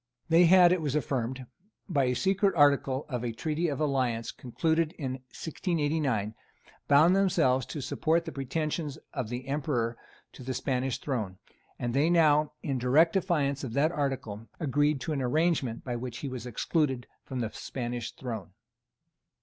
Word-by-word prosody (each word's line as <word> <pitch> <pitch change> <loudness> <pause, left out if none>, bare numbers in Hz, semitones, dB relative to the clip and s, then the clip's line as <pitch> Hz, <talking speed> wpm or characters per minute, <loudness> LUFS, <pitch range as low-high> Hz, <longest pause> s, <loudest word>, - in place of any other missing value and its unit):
They 165 +2 +6
had, 180 0 +7
it 180 -2 +2
was 145 -2 -1
affirmed, 130 -2 -2 0.4
by 145 -8 +2
a 125 0 +1
secret 195 - +2
article 140 -2 +3
of 125 -4 -3
a 120 - -1
Treaty 155 +8 -1
of 140 -4 -2
Alliance 130 -6 0
concluded 160 +5 -1
in 135 -5 -4 0.2
1689, 145 - -1 0.5
bound 155 +6 +6
themselves 160 -10 +2
to 150 - -5
support 165 +5 0
the 160 - -5
pretensions 150 +2 -3 0.2
of 130 -7 -3
the 125 +2 -5
Emperor 130 -5 -1 0.4
to - - -12
the 130 0 -4
Spanish 130 0 -1
throne; 110 -10 -3 0.4
and 120 -1 -2
they 145 +5 +3
now, 155 -3 +4
in 135 -3 -1
direct 150 +7 +4
defiance 155 -8 0
of 125 -4 -5
that 150 +5 +2
article, 130 -8 -3
agreed 145 -1 +1
to 155 - -2
an 140 - -1
arrangement 140 -3 0
by 125 -2 -3
which 120 0 -5
he - - -2
was 125 -2 -6
excluded 130 +1 0 0.2
from 130 -2 -4
the 110 -2 -2
Spanish 120 -3 -5
throne. 110 -8 -6
140 Hz, 160 wpm, -29 LUFS, 125-160 Hz, 0.5 s, had